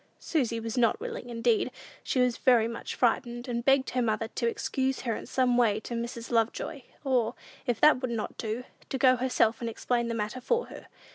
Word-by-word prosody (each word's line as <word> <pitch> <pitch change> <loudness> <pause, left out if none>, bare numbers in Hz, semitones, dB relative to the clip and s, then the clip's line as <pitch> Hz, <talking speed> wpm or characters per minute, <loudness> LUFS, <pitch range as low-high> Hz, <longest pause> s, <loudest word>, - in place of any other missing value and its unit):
Susy 240 -8 -1
was 225 +2 -3
not 230 -2 +3
willing; 245 - -6
indeed, 230 0 +1 0.3
she 260 - 0
was 250 -1 +2
very 235 -3 +4
much 230 0 -5
frightened, 240 +1 0
and 235 -1 -2
begged 270 0 +3
her 250 - 0
mother 220 -1 0
to 235 -1 -1
excuse 265 +3 -1
her 230 -3 -1
in - - -7
some 250 -1 +2
way 220 -4 +3
to 230 - -7
Mrs. 235 0 -4
Lovejoy, 235 +5 0 0.2
or, 250 -3 +1 0.3
if 240 -3 0
that 300 -4 +6
would 255 - -1
not 230 -2 -3
do, 225 +2 -3 0.3
to 265 - -2
go 255 -1 +5
herself 240 -3 +1
and 235 - -2
explain 235 +1 -1
the 230 - -2
matter 215 +3 -3
for 475 - +1
her. - - -11
240 Hz, 205 wpm, -29 LUFS, 230-255 Hz, 0.3 s, that